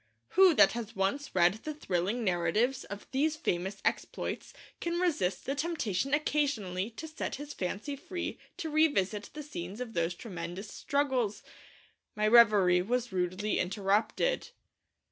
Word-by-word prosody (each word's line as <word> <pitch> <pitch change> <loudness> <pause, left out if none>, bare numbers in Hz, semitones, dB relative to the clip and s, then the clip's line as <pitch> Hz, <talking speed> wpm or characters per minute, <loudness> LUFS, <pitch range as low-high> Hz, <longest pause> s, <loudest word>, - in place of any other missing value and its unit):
Who 375 -3 +6
that - - +7
has 235 -2 -5
once 195 +9 -1
read 175 0 +5
the 305 -1 -4
thrilling 200 - -1
narratives 210 +8 +1
of 200 0 -8
these 300 +4 +1
famous 190 - -2
exploits - - -2 0.3
can 340 0 -1
resist 245 - 0
the 275 - -1
temptation 275 - -1
occasionally 235 -11 0
to 265 +8 -8
set 315 - -4
his 290 +2 -7
fancy 205 +10 -3
free 355 +4 -5 0.2
to 320 - -4
revisit 220 - +2
the 300 - -5
scenes 195 -7 -6
of 245 -3 -5
those 170 -1 0
tremendous 180 0 -6
struggles? 265 -7 0 0.7
My 210 0 +2
reverie 205 -6 +6
was 245 +4 -1
rudely 185 +3 -1
interrupted. 205 - +1
225 Hz, 140 wpm, -31 LUFS, 190-290 Hz, 0.7 s, that